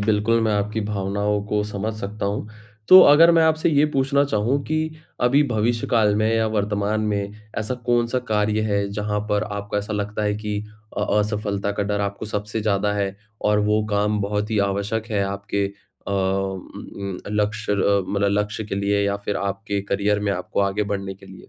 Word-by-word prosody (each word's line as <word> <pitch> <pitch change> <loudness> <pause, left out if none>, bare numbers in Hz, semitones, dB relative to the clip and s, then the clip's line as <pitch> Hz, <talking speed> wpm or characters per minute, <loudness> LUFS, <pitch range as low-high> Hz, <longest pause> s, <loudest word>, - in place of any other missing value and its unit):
बिल्कुल 110 +2 +2
मैं 110 - +1
आपकी 105 +2 -1
भावनाओं 100 0 -1
को 105 0 +1
समझ 105 +1 -3
सकता 100 0 -4
हूँ। 105 +1 -3 0.4
तो 185 - +11
अगर 165 +3 +7
मैं 165 -1 +5
आपसे 160 +1 +3
ये 145 -1 +4
पूछना 140 +1 +2
चाहूँ 130 +3 0
कि 155 +1 -1 0.3
अभी 135 +4 +4
भविष्य 115 +2 0
काल 110 -3 +3
में 110 +1 +2
या 110 -1 +2
वर्तमान 105 0 0
में 100 0 -2 0.3
ऐसा 110 +3 -2
कौन-सा 120 +1 +2
कार्य 105 0 +1
है, 100 -2 0
जहाँ 105 0 -2
पर 105 +1 +2
आपको 100 0 -4
ऐसा 105 +1 -4
लगता 105 +1 -2
है 105 - +1
कि 105 0 -3 0.4
अ, - - 0 0.2
असफलता 105 -1 -1
का 100 - -1
डर 105 0 -1
आपको 100 +1 -3
सबसे 105 +1 -3
ज़्यादा 105 -1 +1
है 100 -1 -1 0.3
और 105 0 +3
वो 105 0 +3
काम 105 +1 +1
बहुत 105 +2 -2
ही 110 - +1
आवश्यक 105 +3 -2
है 100 -2 +1
आपके 100 +1 -2
अ, 100 0 -12
उम, 95 0 0 0.4
उम, 100 -2 -5
लक्ष्य 105 0 -1
अ, 100 0 +2
मतलब 100 0 +1
लक्ष्य 105 +1 -4
के 100 - -4
लिए 100 +1 +1
या 100 - 0
फिर 105 - -1
आपके 100 +1 -2
करियर 105 +1 +1
में 100 -1 0
आपको 90 +1 -2
आगे 100 +1 +1
बढ़ने 100 -1 -3
के 95 - -16
लिए? 95 -1 -13
105 Hz, 195 wpm, -22 LUFS, 100-110 Hz, 0.4 s, तो